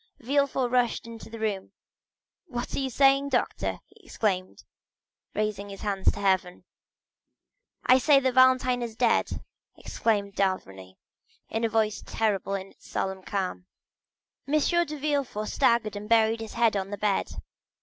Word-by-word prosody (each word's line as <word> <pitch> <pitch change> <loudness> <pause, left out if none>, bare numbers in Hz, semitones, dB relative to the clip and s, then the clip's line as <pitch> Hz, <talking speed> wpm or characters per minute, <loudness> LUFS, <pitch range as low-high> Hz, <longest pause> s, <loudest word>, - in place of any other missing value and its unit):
Villefort 270 0 +1
rushed 245 -2 +1
into 230 -1 -10
the 230 - -8
room. 210 -3 -3 0.7
"What 240 -5 -4
are - - -1
you 270 -1 -1
saying, 275 +2 +4
doctor?" 255 -3 -1
he - - -24
exclaimed, 185 -4 -2 0.7
raising 210 -1 -2
his 195 -1 -9
hands 195 -2 +1
to - - -8
heaven. 190 -3 0 1.2
"I 255 +1 +6
say 280 +1 +5
that 260 -1 0
Valentine 255 -1 +4
is 230 -2 -5
dead!" 235 0 +1 0.3
replied 205 -3 -1
d'Avrigny, 95 - -2 0.5
in 225 +1 -2
a 230 - +2
voice 215 -1 0
terrible 200 -3 -1
in 195 0 -6
its - - -20
solemn 190 0 -3
calmness. 185 -2 -3 0.9
50085m 305 +4 +2
M. 345 - +3
de 300 - -5
Villefort 280 -7 -1
staggered 225 -3 +2
and 205 +1 -7
buried 225 0 +4
his 225 -1 -7
head 230 -2 +2
in 195 -1 -2
the 205 - -5
bed. 205 -2 0
220 Hz, 150 wpm, -27 LUFS, 200-255 Hz, 1.2 s, I